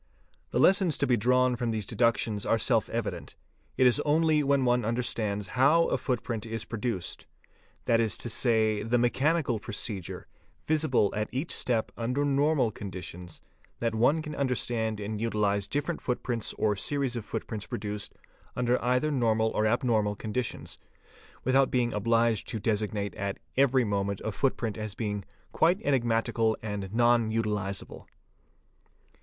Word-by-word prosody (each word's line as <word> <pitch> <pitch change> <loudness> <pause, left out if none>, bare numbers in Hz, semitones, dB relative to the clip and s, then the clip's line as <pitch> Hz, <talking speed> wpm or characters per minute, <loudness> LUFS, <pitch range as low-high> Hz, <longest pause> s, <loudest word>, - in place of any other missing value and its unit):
The - - -2
lessons 190 -5 +4
to - - +1
be 125 -2 +3
drawn 125 +2 +3
from 120 0 -2
these 110 -3 -2
deductions 115 -3 +1
are 115 - +2
self 110 - +1
evident; - - -4 0.4
it 130 - +4
is 125 -3 +5
_ - - +1
only 155 0 +3
when 140 -2 +2
one 120 -1 +2
understands 110 -3 -1
how 145 +7 +4
a - - +1
footprint 120 -3 -2
is 115 0 -4
produced, 115 -5 -4 0.6
that 115 - +3
is 115 -2 +1
to - - -4
say, 110 -2 +2
the 115 +3 +1
mechanical 130 +1 +1
procedure, 100 -3 -5 0.4
visible 150 -9 +2
at 105 +1 -2
each 135 +6 -3
step 115 -3 0
under 125 +5 -1
normal 140 -3 +2
conditions, 90 -4 -8 0.4
that 115 -1 -1
one 140 +8 +2
can 155 -1 -6
understand 120 -5 -1
and 105 +1 -4
utilise 105 -3 0
different 145 +8 -2
footprints 120 -2 -2
or 105 -1 +1
series 135 +4 -1
of 115 - -3
foot - - -4
_ - - -34
prints 110 -2 -5
produced 105 0 -5 0.4
under 125 0 +1
either 125 +5 +1
normal 110 -4 +2
or 110 - +1
abnormal 110 -3 +1
conditions, 110 +3 -4 0.6
without 130 +1 +3
being 120 -2 +1
obliged 115 +1 +1
to 110 - -3
designate 105 -1 -1
at 100 -1 -3 0.2
every 130 -1 +4
moment 100 -2 -1
a 110 - -1
footprint 115 -3 -1
as 110 -2 -4
being 105 -3 -3 0.2
'" - - -36
quite 175 +4 +3
enigmatical 115 -4 +1
and 100 -3 -4
non 120 0 +3
utilisable." 105 -3 -3
115 Hz, 155 wpm, -28 LUFS, 105-130 Hz, 0.6 s, is